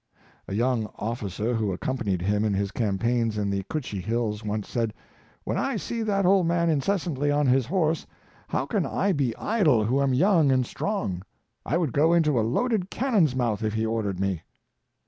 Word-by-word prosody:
A 95 - -4
young 120 -1 +1
officer 110 0 -3
who 110 -4 0
accompanied 100 -2 -2
him 105 +2 +1
in 105 -2 +1
his 100 0 -1
campaigns 115 +1 0
m 100 -1 -1
the 100 0 -1
Cutchee 125 -11 -3
Hills, 110 +1 -2
once 105 0 -3
said, 115 -3 -2 0.2
" - - -32
When - - -2
I 275 - -1
see 230 +2 -3
that 200 -3 +1
old 185 -2 +4
man 170 -1 +2
incessantly 155 -2 0
on 145 0 +2
his 130 -2 +3
horse, 160 -2 0 0.4
how - - -1
can - - -1
I 200 - 0
be 135 -9 0
idle 155 - +2
who 130 +5 +1
am 135 -2 +2
young 165 -2 +4
and 130 -1 +2
strong? 120 - -3 0.5
I 155 - +1
would 165 -8 -1
go 160 +4 +4
into 150 -7 +3
a - - +3
loaded 195 - 0
cannon's 205 - +2
mouth 115 -5 0
if 110 0 -1
he 110 0 0
ordered 110 -4 -2
me." 95 -4 -1
125 Hz, 190 wpm, -26 LUFS, 105-165 Hz, 0.5 s, old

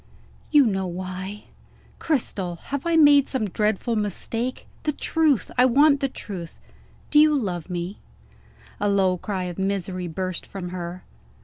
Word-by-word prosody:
"You 295 -3 +6
know 190 -4 0
why." 185 +3 -6 0.6
"Cristel! 200 - -1
Have 280 - -5
I 335 - +2
made 290 -3 +6
some 250 -6 -1
dreadful 215 +4 0
mistake? 225 +4 -2 0.2
The 300 - -1
truth! 305 -3 +1
I 250 - +7
want 280 +3 +5
the 275 - 0
truth! 180 -9 -8 0.5
Do 300 - +6
you 305 0 +6
love 185 - -2
me?" 180 +3 -4 0.8
A 205 - +1
low 190 -2 +2
cry 190 -1 -3
of 180 0 -5
misery 190 -2 -2
burst 185 +2 -3
from 185 -3 -6
her. 180 0 -6
200 Hz, 145 wpm, -24 LUFS, 185-270 Hz, 0.8 s, I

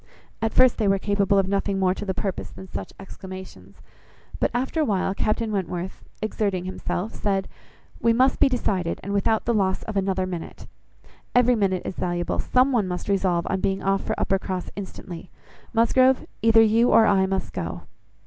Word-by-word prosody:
At 225 -1 0
first, 255 +1 +4
they 215 - +2
were 195 0 +3
capable 200 0 +1
of 195 -1 +3
nothing 195 0 0
more 185 -1 +2
to 195 - -6
the 190 -2 -2
purpose 195 -3 -3
than 190 - -11
such - - -6
exclamations; 185 - -11 0.6
but, - - +2
after 260 +7 -1
a - - +4
while, 195 -6 0
Captain 215 +2 -1
Wentworth, 185 -2 -4 0.2
exerting 200 -4 -1
himself, 185 +2 -4
said— 195 -2 -1 0.5
"We 230 - +3
must 255 +3 +3
be - - +5
decided, 195 -9 -1
and 200 - -4
without 215 +2 +1
the 235 - +1
loss 190 -3 +1
of 220 - -6
another 190 -1 0
minute. 175 -3 -7 0.7
Every 245 0 +5
minute 195 -5 0
is - - -5
valuable. 175 -1 -2
Some 255 +2 +3
one 225 -7 +1
must 180 +2 -4
resolve 185 -3 +1
on 190 - -1
being 195 0 -1
off 195 0 +1
for - - -3
Uppercross 190 -1 -1
instantly. 185 -3 -8 0.4
Musgrove, 255 +3 +3 0.2
either 225 0 +6
you 225 +2 +4
or 225 0 +6
I 195 -2 +3
must 190 0 -3
go." - - -4
195 Hz, 180 wpm, -24 LUFS, 185-225 Hz, 0.7 s, either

